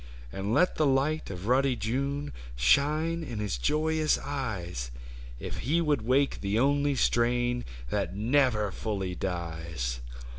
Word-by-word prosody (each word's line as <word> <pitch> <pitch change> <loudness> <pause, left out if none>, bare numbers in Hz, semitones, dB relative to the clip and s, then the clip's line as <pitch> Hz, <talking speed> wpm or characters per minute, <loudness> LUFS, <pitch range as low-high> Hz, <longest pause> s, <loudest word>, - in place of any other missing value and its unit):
And 95 +2 -3
let 180 +10 +3
the 155 - +3
light 140 +4 +1
of 95 -1 -6
ruddy 130 +2 +3
June 140 +6 -2 0.2
Shine 150 - +2
in 125 -7 -6
his 105 -12 -2
joyous 155 - +2
eyes. 95 - -4 0.5
If - - -5
he 150 +8 +1
would 150 -6 +1
wake 130 +5 +2
the 100 +2 0
only 140 +3 +3
strain 120 0 +2 0.3
That 90 - -1
never 110 -2 +2
fully 95 -3 -3
dies 80 -9 -3
120 Hz, 135 wpm, -29 LUFS, 95-145 Hz, 0.5 s, let